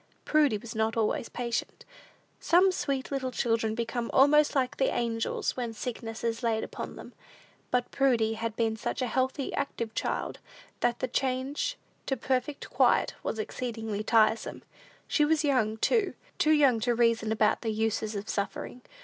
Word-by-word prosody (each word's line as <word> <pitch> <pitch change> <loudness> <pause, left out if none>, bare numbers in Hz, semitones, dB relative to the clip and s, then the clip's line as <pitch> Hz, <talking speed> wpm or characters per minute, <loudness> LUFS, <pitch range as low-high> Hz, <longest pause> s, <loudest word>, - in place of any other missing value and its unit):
Prudy 295 -8 +3
was 225 +3 -9
not 220 0 0
always 225 +1 0
patient. 235 -1 -3 0.5
Some 365 +3 +4
sweet 275 -7 -2
little 265 -2 -1
children 225 -3 0
become 235 0 -2
almost 295 +3 +5
like 265 0 0
the 265 - +2
angels 230 -1 -1
when 240 -3 -3
sickness 225 -1 -5
is 230 +1 -1
laid 225 -2 0
upon - - -6
them; - - -11 0.6
but 250 -1 0
Prudy 240 -5 +2
had 225 0 -3
been 225 -1 +1
such 225 - -3
a - - +1
healthy, 260 +3 -1
active 230 -5 -3
child, - - -2 0.4
that 240 0 0
the 255 - 0
change 270 - -1 0.3
to 270 - 0
perfect 265 +2 -2
quiet - - +3
was - - -3
exceedingly 220 -1 -4
tiresome. 220 0 +2 0.4
She 300 - +2
was 310 +1 +2
young, 235 -7 +1
too, 425 - +1 0.2
too 310 - +3
young 280 -6 +5
to 240 +1 +1
reason 230 -2 +2
about 215 -1 +2
the 225 - -2
uses 220 0 -1
of 200 +1 -4
suffering. 210 +4 -3
235 Hz, 160 wpm, -29 LUFS, 225-270 Hz, 0.6 s, almost